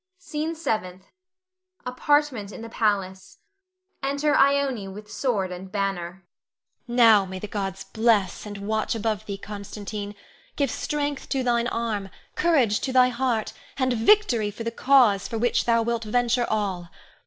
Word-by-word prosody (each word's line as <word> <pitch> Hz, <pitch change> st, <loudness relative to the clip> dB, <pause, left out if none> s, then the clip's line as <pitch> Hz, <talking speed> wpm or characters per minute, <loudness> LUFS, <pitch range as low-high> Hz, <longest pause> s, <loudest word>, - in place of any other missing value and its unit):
SCENE 315 Hz, 0 st, -4 dB
SEVENTH. 190 Hz, -, -3 dB, 0.8 s
[Apartment 250 Hz, -4 st, +1 dB
in 225 Hz, -, -9 dB
the 230 Hz, -, -7 dB
palace. 195 Hz, -4 st, -1 dB, 0.6 s
Enter 285 Hz, +2 st, +1 dB
Ione 275 Hz, -6 st, +2 dB
with 210 Hz, +2 st, -10 dB
sword 210 Hz, -6 st, -1 dB
and 185 Hz, +1 st, -8 dB
banner.] 190 Hz, -2 st, -3 dB, 0.6 s
Ione. 240 Hz, -, -3 dB
Now 220 Hz, -5 st, +7 dB
may 190 Hz, 0 st, -7 dB
the 185 Hz, -, -6 dB
gods 195 Hz, -2 st, -4 dB
bless 220 Hz, -4 st, +1 dB
and 205 Hz, -1 st, -7 dB
watch 220 Hz, +1 st, 0 dB
above 220 Hz, -2 st, -2 dB
thee, 200 Hz, -1 st, -4 dB
Constantine; 205 Hz, 0 st, -7 dB, 0.4 s
give 280 Hz, -4 st, 0 dB
strength 290 Hz, -2 st, -3 dB
to 270 Hz, -2 st, 0 dB
thine 240 Hz, -1 st, +1 dB
arm, 220 Hz, -5 st, -2 dB, 0.2 s
courage 265 Hz, -12 st, +2 dB
to 265 Hz, -, -3 dB
thy 255 Hz, -1 st, +5 dB
heart, 240 Hz, -3 st, -1 dB, 0.2 s
and 260 Hz, -2 st, +1 dB
victory 235 Hz, -, +3 dB
to 230 Hz, -, -6 dB
the 230 Hz, -, -2 dB
cause 245 Hz, -5 st, +4 dB
for 230 Hz, -, -4 dB
which 240 Hz, +2 st, +1 dB
thou 230 Hz, -1 st, +3 dB
wilt 235 Hz, 0 st, -1 dB
venture 240 Hz, +2 st, +1 dB
all. 190 Hz, -5 st, -2 dB
225 Hz, 150 wpm, -25 LUFS, 200-255 Hz, 0.8 s, Now